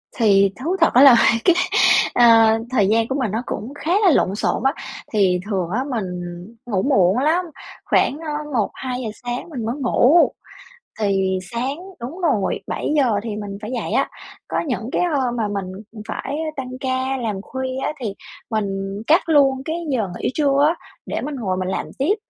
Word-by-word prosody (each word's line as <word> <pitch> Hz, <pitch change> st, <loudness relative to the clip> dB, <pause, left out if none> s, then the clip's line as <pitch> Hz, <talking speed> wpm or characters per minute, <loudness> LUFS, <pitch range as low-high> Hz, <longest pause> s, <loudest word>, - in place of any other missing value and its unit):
Thì 200 Hz, -4 st, +4 dB
thú 350 Hz, +4 st, 0 dB
thật -, -, +4 dB
á 250 Hz, -, +6 dB
là 275 Hz, -4 st, +9 dB, 0.3 s
cái, 350 Hz, -, +5 dB, 0.6 s
ờ, 225 Hz, -2 st, +6 dB
thời 210 Hz, -7 st, +2 dB
gian 225 Hz, +1 st, +2 dB
của 265 Hz, -, -2 dB
mình 225 Hz, -6 st, -1 dB
nó 225 Hz, +3 st, -2 dB
cũng 245 Hz, +7 st, -5 dB
khá 310 Hz, +3 st, -4 dB
là 360 Hz, -, +7 dB
lộn 195 Hz, -8 st, +2 dB
xộn 220 Hz, -, -1 dB
á. 270 Hz, -, +3 dB, 0.4 s
Thì 185 Hz, -4 st, +3 dB
thường 185 Hz, -4 st, -1 dB
á, 235 Hz, +7 st, -1 dB
mình 210 Hz, -7 st, -2 dB, 0.5 s
ngủ 200 Hz, -6 st, 0 dB
muộn 235 Hz, -6 st, +3 dB
lắm, 330 Hz, +6 st, +2 dB, 0.4 s
khoảng, 285 Hz, -, +2 dB
ơ, 310 Hz, -2 st, -5 dB, 0.2 s
1:00-2:00 250 Hz, +1 st, -2 dB
sáng 245 Hz, +7 st, -4 dB
mình 245 Hz, -8 st, -5 dB
mới 230 Hz, +3 st, -2 dB
ngủ, 280 Hz, +4 st, +4 dB, 0.7 s
thì 190 Hz, -2 st, +1 dB
sáng 250 Hz, +4 st, -2 dB, 0.2 s
đúng 275 Hz, +11 st, -7 dB
rồi, 275 Hz, -, +1 dB
7:00 275 Hz, -7 st, +1 dB
thì 215 Hz, -3 st, -4 dB
mình 205 Hz, -1 st, -6 dB
phải 215 Hz, +2 st, -6 dB
dậy 245 Hz, -, -3 dB
á. -, -, +1 dB, 0.4 s
Có -, -, -1 dB
những 240 Hz, -2 st, -3 dB
cái -, -, 0 dB, 0.2 s
hôm 245 Hz, -2 st, -1 dB
mà 220 Hz, -, 0 dB
mình 200 Hz, -2 st, -3 dB, 0.4 s
phải 275 Hz, +5 st, -4 dB, 0.2 s
tăng 255 Hz, -2 st, -4 dB
ca 260 Hz, 0 st, -1 dB
làm 215 Hz, -6 st, -3 dB
khuya 260 Hz, +3 st, -5 dB
á, -, -, -1 dB
thì 220 Hz, -6 st, -3 dB, 0.4 s
mình 215 Hz, -2 st, 0 dB, 0.4 s
cắt 330 Hz, +2 st, +3 dB
luôn 275 Hz, -4 st, +4 dB
cái 320 Hz, -, -2 dB, 0.2 s
giờ 220 Hz, -7 st, 0 dB
nghỉ -, -, -1 dB
trưa 280 Hz, -1 st, +3 dB
á, 330 Hz, -, +1 dB, 0.3 s
để -, -, -3 dB
mình 290 Hz, +1 st, -4 dB
ngồi 195 Hz, -8 st, -2 dB
mình 185 Hz, 0 st, -2 dB
làm -, -, -2 dB
tiếp, 320 Hz, +10 st, +2 dB
245 Hz, 185 wpm, -21 LUFS, 210-275 Hz, 0.7 s, là